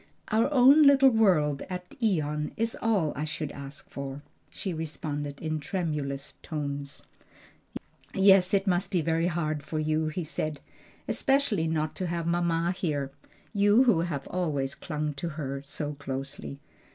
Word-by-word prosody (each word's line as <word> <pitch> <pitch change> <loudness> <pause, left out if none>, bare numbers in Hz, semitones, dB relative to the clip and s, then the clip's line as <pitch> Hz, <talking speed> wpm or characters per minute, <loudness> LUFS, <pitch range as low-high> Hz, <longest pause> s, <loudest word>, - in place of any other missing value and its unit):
"Our 225 +6 +2
own 275 +2 +7
little 275 -2 +7
world 175 - +3
at 180 -1 -6
Ion 150 -7 0
is 225 0 0
all 200 -9 +1
I 150 - -3
should 155 -1 -3
ask 140 +1 -9
for," 140 +1 -6 0.3
she 190 - -4
responded 145 -2 -4
in 155 -1 -2
tremulous 150 -4 -3
tones. 145 -3 -5 1.1
"Yes, 190 -1 +6
it 195 0 +1
must 180 -1 +1
be 180 -4 +1
very 165 +2 +1
hard 155 -3 -1
for 155 +2 -5
you," 155 0 +1
he 165 +3 -3
said; 155 -1 -3 0.5
"especially 270 - +1
not 155 -1 -1
to 185 - -1
have 170 -1 -2
mamma 170 0 +1
here, 145 -7 -2 0.4
you 205 +4 +5
who 235 -10 +4
have 160 -5 -2
always 145 -7 -1
clung 150 -2 -3
to 155 +5 -4
her 140 -2 -3
so 145 +1 -5
closely. 140 0 -6
160 Hz, 150 wpm, -28 LUFS, 145-185 Hz, 1.1 s, own